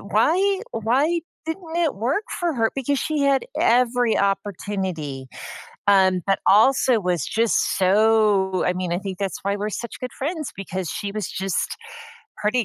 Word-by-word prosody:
Why 360 - +2
why 275 +10 +1 0.3
didn't 325 0 -5
it 335 -4 +1
work 265 - -1
for 345 -4 0
her?" 225 -2 +1
Because 275 +1 -1
she 305 +4 -1
had 275 -1 +2 0.2
every 245 -1 +3
opportunity, 190 -8 -2 0.6
um, 190 -2 +4
but 195 0 +1
also 245 +3 +5
was 180 -6 -1
just 225 0 +1
so 200 -1 +3
I 180 - +2
mean, 180 -1 -3
I 175 - +1
think 195 -2 -6
that's 195 -2 -2
why 200 +1 0
we're 210 +1 -2
such 235 +3 -6
good 250 -1 -6
friends 310 +2 -4
because 190 -3 -4
she 200 -1 -4
was 210 -3 -4
just 190 -1 -2 0.6
pretty 225 +3 0
215 Hz, 155 wpm, -23 LUFS, 195-270 Hz, 0.6 s, also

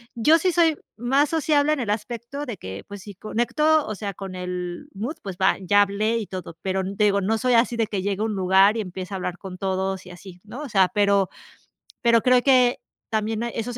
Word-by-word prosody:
Yo 305 +8 +4
sí 365 +3 +1
soy 330 -3 +3 0.2
más 270 +5 +2
sociable 305 -1 +2
en 305 - -2
el 225 -5 -1
aspecto 235 +6 -5
de 230 -5 -5
que 95 +1 -8
pues 200 -1 -9
si 205 - -9
conecto, 295 - +1
o 215 - -3
sea, 200 0 -5
con 195 -1 -7
el 180 -1 -5
mood 235 +11 -4
pues 190 -3 -6
va, 190 - +3
ya 205 +2 +4
hablé 210 +3 0
y 225 - -3
todo, 180 -3 -7
pero 190 0 0
digo, 200 +1 +1
no 220 +4 +1
soy 250 +1 +1
así 235 0 +2
de 225 - +2
que 200 -3 -3
llegue 200 0 -2
a - - +1
un 220 - -2
lugar 190 +3 +4
y - - 0
empiece 185 0 -7
a - - -2
hablar 180 -1 -4
con 190 -2 -9
todos 190 0 -2
y 180 - -10
así, 180 0 -12
¿no?, 230 +7 -9
o 290 - -7
sea, 190 -4 +4
pero 200 -3 +2 0.7
pero 235 -2 +4
creo 250 +1 +4
que 255 -2 +4 0.3
también 220 +1 -1
esos 235 0 -4
210 Hz, 225 wpm, -23 LUFS, 190-245 Hz, 0.7 s, Yo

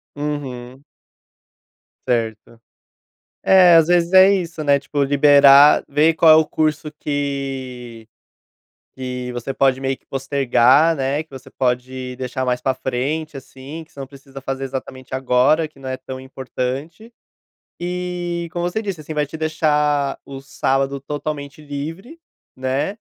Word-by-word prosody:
Uhum. 135 -3 -6 1.2
Certo. 115 -1 -2 0.8
É, 180 -3 +6
às 165 -1 +6
vezes 175 0 +2
é 190 +1 +8
isso, 170 -4 -3
né, 140 -1 +3
tipo, 145 +1 -3
liberar, 140 0 +6
ver 150 +3 +3
qual 160 -1 +6
é - - +9
o 160 0 +4
curso 155 -1 -1
que 135 -5 -4 0.9
que 125 -1 -5
você 120 +2 -5
pode 135 -1 +2
meio 135 0 -2
que - - -41
postergar, 135 +2 +3
né, 140 +3 -1
que 160 - -35
você 135 0 -12
pode 125 0 -3
deixar 130 0 -4
mais 125 0 0
para 130 0 0
frente, 135 +4 -3
assim, 135 +4 -10
que - - -31
você 140 - -13
não 135 - -5
precisa 135 0 -13
fazer 135 0 -4
exatamente 130 -1 -6
agora, 130 +5 +2
que 135 - -22
não 135 - -9
é 130 - -2
tão 130 0 -9
importante 135 - -6 0.7
e, 175 -1 -4
como 175 +1 -3
você 220 +5 -3
disse, 190 -7 -5
assim, 155 - -7
vai 150 -1 0
te 160 - -8
deixar 150 -3 0
o 135 -1 -9
sábado 135 0 -1
totalmente 145 +1 -6
livre, 160 - -7 0.4
né, 130 +10 -2
140 Hz, 145 wpm, -20 LUFS, 130-155 Hz, 1.2 s, é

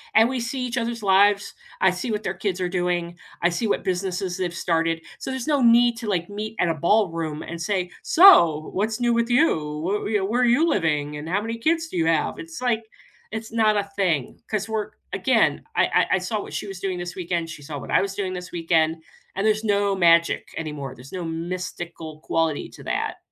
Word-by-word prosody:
and 225 +1 +7
we 260 -1 -2
see 245 +3 -3
each 245 0 -4
other's 230 -1 -2
lives, 200 +1 +4 0.3
I 190 - +5
see 205 +7 -4
what 210 0 -2
their 190 - -2
kids 190 0 -3
are 180 - 0
doing, 175 -1 -1 0.3
I 175 - +5
see 180 +6 -1
what - - 0
businesses 185 0 -2
they've 180 -2 -2
started, 165 -1 0 0.2
so, - - -5
there's 265 +1 -4
no 290 -3 +2
need 240 0 +5
to, 230 -1 -6
like, 175 -4 -1
meet 215 +2 -5
at 175 - +3
a - - +2
ballroom 165 -3 0
and 170 0 -7
say, 180 0 -1
"So, 170 - +6
what's 215 +4 -1
new 240 -1 +2
with 235 0 +1
you? 160 - +2 0.2
Whe - - -3
you - - +4
know, 190 - -1
where 235 +5 0
are - - +4
you 260 +8 +4
living 150 - 0
and 150 +2 -7
how 190 +4 +1
many 225 +2 -4
kids 325 +7 +1
do 320 - -6
you 165 - +2
have?" 165 -1 +1
It's 165 +7 -8
like 240 -3 +1 0.5
it's 220 +1 -6
not 220 -2 +3
a 205 - +1
thing 170 -10 0
'cause 215 -1 -1
we're 215 -1 -2 0.2
again, - - +2
I - - +4 0.3
I - - +5
I - - +2
saw 205 +4 -2
what - - -9
she - - -4
was 195 -2 -7
doing 190 -1 -2
this 175 0 -6
weekend, 170 -2 -2
she 155 -2 -9
saw 145 +1 -6
what - - -8
I - - +4
was 195 0 -3
doing 190 -2 -2
this 180 0 -7
weekend, 165 -1 +1 0.3
and 195 +3 -1
there's 215 0 +2
no 200 -2 +1
magic 170 -2 +3
anymore, 145 -5 -5
there's 125 +3 -13
no 185 -2 -4
mystical 165 -1 -5
quality 160 -2 -1
to - - -13
that. - - -2
190 Hz, 225 wpm, -24 LUFS, 165-220 Hz, 0.5 s, and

